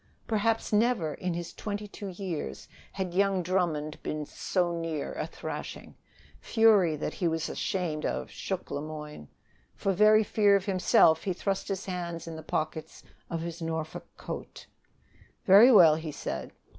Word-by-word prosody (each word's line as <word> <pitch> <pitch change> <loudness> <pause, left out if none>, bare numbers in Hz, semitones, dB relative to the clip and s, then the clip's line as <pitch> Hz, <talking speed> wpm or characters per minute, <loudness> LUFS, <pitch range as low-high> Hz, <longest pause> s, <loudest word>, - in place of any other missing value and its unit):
Perhaps 225 0 0
never 210 -8 +2
in 180 +1 -3
his 170 -1 -5
twenty 210 0 -5
two 200 0 -8
years 175 - -5 0.3
had 185 -3 -3
young 195 -1 +2
Drummond 165 -4 -1
been 150 -1 -3
so 175 +3 -1
near 165 -3 -3
a - - -3
thrashing. - - -7 0.5
Fury 205 - +4
that 150 - -4
he 175 - -1
was 165 -1 -1
ashamed 170 -5 -2
of 65 0 -3
shook - - -5
Le 145 - -2
Moyne. 150 - -8 0.5
For 195 - 0
very 215 +3 +6
fear 205 -1 +3
of 195 -1 0
himself, 180 -4 +4
he 190 - 0
thrust 195 +2 -2
his 195 -1 -3
hands 170 -3 -4
in 165 -1 -7
the 160 - -7
pockets 155 0 -4 0.3
of 165 -1 -3
his 170 +1 -6
Norfolk 160 -1 -4
coat. - - -7 0.8
"Very 205 +7 +8
well," 170 -9 +8
he 155 0 -4
said. 65 - -5
175 Hz, 155 wpm, -29 LUFS, 155-195 Hz, 0.8 s, Very